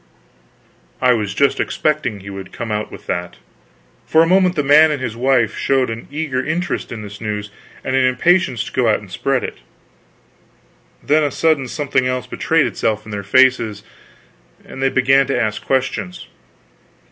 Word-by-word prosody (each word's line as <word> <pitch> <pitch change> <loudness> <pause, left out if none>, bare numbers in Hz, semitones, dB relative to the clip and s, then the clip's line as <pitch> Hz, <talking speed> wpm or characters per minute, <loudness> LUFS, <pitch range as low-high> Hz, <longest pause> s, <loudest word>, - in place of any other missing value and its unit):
I 125 -1 +4
was 105 -3 -2
just 140 +2 +2
expecting 150 -9 -1
he 100 +1 -9
would 95 -1 -8
come 115 -2 -5
out 105 0 -3
with - - -11
that. 90 0 -3 0.7
For 160 +1 +5
a - - +1
moment 185 0 +3
the 150 - 0
man 150 +3 +6
and 150 -2 -2
his 120 -4 -4
wife 120 -3 +1
showed 130 -3 +1
an 115 +1 -7
eager 145 -3 -2
interest 175 +4 -3
in 110 -2 -6
this 100 -1 -10
news 105 -2 -4 0.3
and 130 - -1
an 130 - +3
impatience 130 - +2
to - - -9
go 120 -3 +1
out 105 - +3
and 100 -3 -14
spread 130 +6 -1
it; - - -6 1.4
then 150 +2 +3
a 145 - +1
sudden 150 -2 +1
something 130 -2 -1
else 130 0 -2
betrayed - - +1
itself 110 -1 -2
in 110 - -9
their 100 -1 -4
faces, 110 -1 +2 0.8
and 130 - -9
they 135 - +3
began 135 +1 +3
to 135 -3 0
ask 110 -2 -2
questions. 135 +7 -2
130 Hz, 175 wpm, -18 LUFS, 110-140 Hz, 1.4 s, man